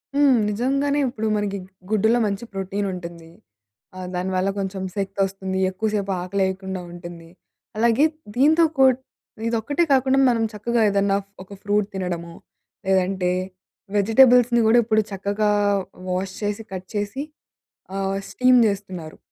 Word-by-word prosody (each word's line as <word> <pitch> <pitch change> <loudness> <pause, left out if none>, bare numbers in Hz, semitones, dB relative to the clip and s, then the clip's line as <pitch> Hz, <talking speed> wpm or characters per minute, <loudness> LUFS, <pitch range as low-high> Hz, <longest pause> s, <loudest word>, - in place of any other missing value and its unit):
హ్మ్. 285 -2 +5
నిజంగానే. 275 +6 0
ఇప్పుడు 220 -2 -3
మనకి 205 -1 -1 0.3
గుడ్డులో 220 +2 +3
మంచి 200 +1 -2
ప్రోటీన్ 195 +1 -3
ఉంటుంది. 170 -2 -8 0.7
ఆహ్, 185 -1 -6
దానివల్ల 185 +1 0
కొంచెం 190 0 -3
శక్తొస్తుంది. 195 -1 -2
ఎక్కువసేపు 205 0 -2
ఆకలేయకుండా 190 0 -2
ఉంటుంది. 175 -1 -10 0.5
అలాగే 235 +5 +4 0.3
దీంతో 310 +6 +5
కూడ్ 265 -1 +5 0.5
ఇదొక్కటే 235 +8 0
కాకుండా 265 0 +3
మనం 230 -2 +1
చక్కగా 230 +2 0
ఏదన్నా 200 0 +2
ఫ్ - - -36
ఒక 190 - -21
ఫ్రూట్ 205 0 +1
తినడమో, 175 -3 -4 0.5
లేదంటే 190 -1 +1 0.7
వెజిటబుల్స్‌ని 240 +3 +5
గూడా 220 +2 +5
ఇప్పుడు 220 -1 +2
చక్కగా 200 +2 -1 0.6
వాష్ 185 +1 -2
చేసి, 205 +1 -2
కట్ 185 0 -6
చేసి 205 +7 -2 0.7
ఆహ్, 195 0 -1
స్టీమ్ 255 0 +4
జేస్తున్నారు. 190 -6 -4
200 Hz, 120 wpm, -23 LUFS, 190-235 Hz, 0.7 s, హ్మ్